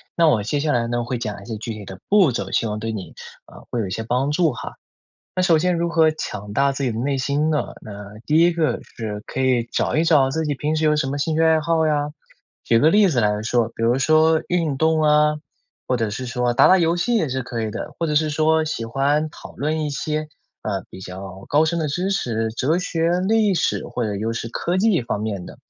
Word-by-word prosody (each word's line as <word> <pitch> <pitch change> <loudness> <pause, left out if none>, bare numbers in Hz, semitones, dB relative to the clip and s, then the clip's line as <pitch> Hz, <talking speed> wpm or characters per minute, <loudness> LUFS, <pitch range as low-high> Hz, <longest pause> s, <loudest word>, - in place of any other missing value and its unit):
那 165 -1 +4
我 120 -8 +3
接 125 +8 -1
下 150 -1 0
来 115 -1 +1
呢 120 0 -1
会 120 0 -3
讲 105 -4 -4
一 - - -13
些 110 -2 -5
具 115 +1 -5
体 105 -2 -9
的 95 -1 -9
步 195 -9 +5
骤， 100 -5 -3
希 - - +1
望 105 0 -3
对 115 +1 -3
你， 105 -4 -7 0.3
啊， - - -14
会 120 - -2
有 - - -2
一 - - -7
些 110 - -3
帮 125 +5 0
助 160 -1 +2
哈。 120 - -7 0.6
那 185 - 0
首 170 -3 +4
先 180 +2 +1
如 170 0 0
何 160 -2 +4
强 105 -9 -6
大 140 +4 +2
自 135 0 -3
己 120 - 0
的 110 - -5
内 140 +3 0
心 140 +3 0
呢？ 155 -2 -1
那 105 0 -10
第 155 +2 +4
一 175 0 +4
个 165 -2 0
是 105 -2 -7
可 130 - -4
以 125 -3 +2
找 120 - -1
一 160 - +3
找 145 -5 +4
自 160 +3 -1
己 150 - -1
平 150 +3 -1
时 155 - 0
有 150 - +4
什 150 -3 0
么 135 - -3
兴 155 +2 -1
趣 160 - +2
爱 160 -1 +4
好 160 0 +1
呀。 150 -1 0 0.5
举 115 - +3
个 155 +6 +5
例 205 0 +5
子 135 -7 0
来 105 0 +1
说， 115 +1 +1
比 115 - -6
如 120 +3 +3
说 155 +2 +4
运 165 -6 0
动 160 +1 +2
啊， 150 0 +4 0.5
或 125 - +2
者 115 -3 -1
是 125 +4 -5
说 125 0 0
打 - - +5
打 190 - +7
游 170 -1 +2
戏 240 +7 0
也 160 - 0
是 130 0 -2
可 115 -2 -4
以 110 - -2
的， - - -6
或 165 - 0
者 150 - -1
是 155 +1 +2
说 155 +1 +2
喜 135 -7 -3
欢 145 +6 0
讨 - - -12
论 155 +2 -1
一 - - -2
些， 155 +2 -3 0.3
呃， 100 -3 -3
比 - - -10
较 95 +1 -9
高 150 +2 +4
深 170 +2 0
的 155 -2 -1
知 180 +7 -1
识， 115 - -1
哲 135 +9 0
学、 170 -1 0
历 215 -3 +3
史 165 - 0
或 120 - -3
者 105 -1 -2
又 110 +3 -2
是 115 - -4
科 175 +8 -1
技 200 -3 +3
方 115 -3 -3
面 100 -5 -4
的。 - - -11
145 Hz, 275 characters per minute, -22 LUFS, 115-160 Hz, 0.6 s, 打